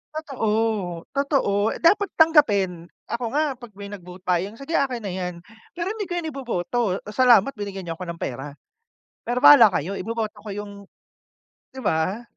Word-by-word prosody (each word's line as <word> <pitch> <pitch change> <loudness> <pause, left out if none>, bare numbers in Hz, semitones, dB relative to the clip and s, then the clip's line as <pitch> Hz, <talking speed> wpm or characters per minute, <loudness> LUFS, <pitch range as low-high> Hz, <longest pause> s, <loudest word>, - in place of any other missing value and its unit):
Totoo, 275 -8 -3 0.7
totoo 265 -7 +1
dapat 400 +4 +4
tanggapin, 205 - +3 0.2
ako 235 +1 -2
nga 300 +2 +2 0.2
'pag 240 -4 -11
may 200 0 -8
nag-vote 180 -2 -10
buying, 185 +4 0
sige 275 +5 -7
akin 255 -5 0
na 195 - -3
'yan, 180 -1 -3 0.4
pero 350 +3 -2
hindi 425 -3 -4
ko 350 - -4
yun 320 -2 -3
iboboto. 245 -5 -3 0.3
Salamat 245 +1 +5
binigyan 200 -2 -6
niyo 165 -1 -4
'ko 185 - -6
ng 170 0 -6
pera, 135 +3 -5 0.7
pero 245 +1 -1
bahala 285 -6 +10
kayo 190 +7 -2
iboboto 220 0 -4
ko 210 0 -9
yung 205 0 -6 1.0
'di 265 - -7
ba? 185 +6 0
215 Hz, 160 wpm, -23 LUFS, 185-275 Hz, 1.0 s, bahala